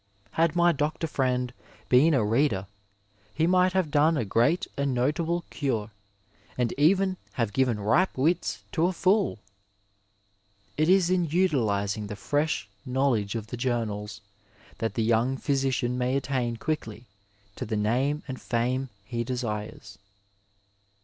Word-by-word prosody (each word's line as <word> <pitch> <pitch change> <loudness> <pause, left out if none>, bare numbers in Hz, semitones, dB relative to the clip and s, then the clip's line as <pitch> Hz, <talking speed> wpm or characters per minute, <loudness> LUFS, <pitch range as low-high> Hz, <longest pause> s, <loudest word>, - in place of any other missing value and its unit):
Had 165 +5 +1
my 175 0 +5
doctor 155 +1 -1
friend 125 -4 -1 0.3
been 145 +5 +5
a 115 -5 +2
reader 110 -3 +1 0.7
he 160 - +2
might 185 +1 +3
have 185 -6 0
done 155 +2 +3
a 120 - -1
great 120 - +2
and 140 -2 -1
notable 160 +7 0
cure 115 -7 -2 0.7
and 125 -2 0
even 185 +5 +3 0.2
have 115 -5 -1
given 125 -4 +1
ripe 150 - +2
wits 160 +6 0
to 170 +1 +2
a 185 - -1
fool! 190 - +2 1.4
It 155 +3 +2
is 185 -2 +4
in 180 -2 +2
utilizing 110 - 0
the 105 - -6
fresh 145 -2 -1 0.2
know 130 +2 +1
ledge 105 -2 -1
of 110 -2 -3
the 120 +3 -7
journals 110 -4 -2 0.6
that 115 -3 -2
the 115 - +1
young 120 +4 +2
phjrsician 135 -3 0
may 125 +1 0
attain 125 -3 -1
quickly 115 -5 -4 0.5
to - - -5
the 110 0 -2
name 130 +8 0
and 130 -2 -6
fame 125 +3 -1 0.2
he 120 +1 -3
desires. 105 -5 -5
130 Hz, 145 wpm, -27 LUFS, 115-155 Hz, 1.4 s, my